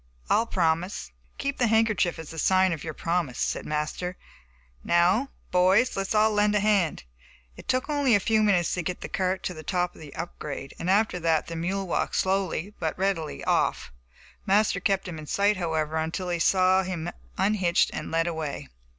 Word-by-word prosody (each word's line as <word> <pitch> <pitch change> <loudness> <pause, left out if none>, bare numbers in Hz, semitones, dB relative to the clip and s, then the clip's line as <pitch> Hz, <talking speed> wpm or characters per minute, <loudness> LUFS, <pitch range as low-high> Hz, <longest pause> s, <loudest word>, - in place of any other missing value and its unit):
I'll 230 - +3
promise." 175 0 -1 0.3
"Keep 280 0 -3
the 245 - +3
handkerchief 220 -5 +2
as 160 0 -8
a 165 - -6
sign 185 +2 +3
of 160 - -6
your 155 -2 -5
promise," 165 -7 -1
said - - -2
Master; 155 +4 -3 0.7
"now, 185 +10 +3 0.2
boys, 185 +7 +4
let's 195 +2 -2
all 215 +1 +4
lend 210 0 +2
a - - +4
hand." 200 -6 +1 0.5
It - - -3 0.2
only 285 -4 +1
took 205 - +6
a - - -11
few 220 -1 +3
minutes 190 -5 +2
to 180 - -1
get 180 +2 -4
the - - -5
cart 185 0 -1
to 180 - -3
the 155 - -9
top 180 +2 -1
of - - -15
the 150 -2 -11
up 170 +2 -6
grade, 140 -2 -6
and 175 - -2
after 200 -2 +2
that 165 -2 +1
the 165 - -6
mule 190 +4 -2
walked - - -1
slowly 190 0 0
but 160 -2 -2
readily 185 -5 -2
off. - - 0 0.5
Master 200 -1 +2
kept 195 0 0
him 165 -3 -6
in 155 - -9
sight, 205 +4 +2
however, 160 -3 -1
until 165 +3 -2
he 175 -1 -1
saw 185 +2 +4
him 180 -3 -4 0.3
unhitched 190 -4 +2
and 155 - -5
led 165 0 +1
away. 160 - -4
180 Hz, 195 wpm, -26 LUFS, 165-200 Hz, 0.7 s, took